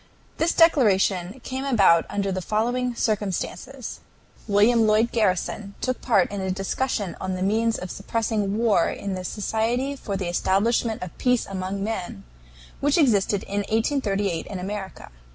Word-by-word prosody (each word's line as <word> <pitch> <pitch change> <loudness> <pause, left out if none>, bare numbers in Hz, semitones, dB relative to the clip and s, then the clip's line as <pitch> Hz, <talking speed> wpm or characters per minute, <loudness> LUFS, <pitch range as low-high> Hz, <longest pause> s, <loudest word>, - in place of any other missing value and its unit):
This 335 +1 +2
declaration 205 - +3
came 260 +1 -4
about 195 -11 +4
under 200 -1 -1
the 185 0 -2
following 240 +5 -1
circumstances: 215 +4 -3 0.5
William 220 +2 +4
Lloyd 215 +2 +3
Garrison 200 -1 -1
took 255 -1 -2
part 200 -8 +2
in 200 -1 -3
a 190 - -2
discussion 195 +2 -2
on 185 0 -2
the 185 - -2
means 225 +3 +1
of 180 0 -6
suppressing 210 -1 -1
war 220 -7 +3
in 200 -1 -4
the 185 -1 -4
Society 225 +7 -1
for 200 -7 -4
the 190 -2 -3
Establishment 210 +5 +1
of 180 - -8
Peace 250 -2 +2
among 195 +1 -4
Men, 185 - -4 0.6
which 290 +2 +2
existed 210 - +2
in 200 +1 -3
1838 205 - 0
in 200 - -5
America. 195 +1 -6
210 Hz, 150 wpm, -24 LUFS, 190-235 Hz, 0.6 s, about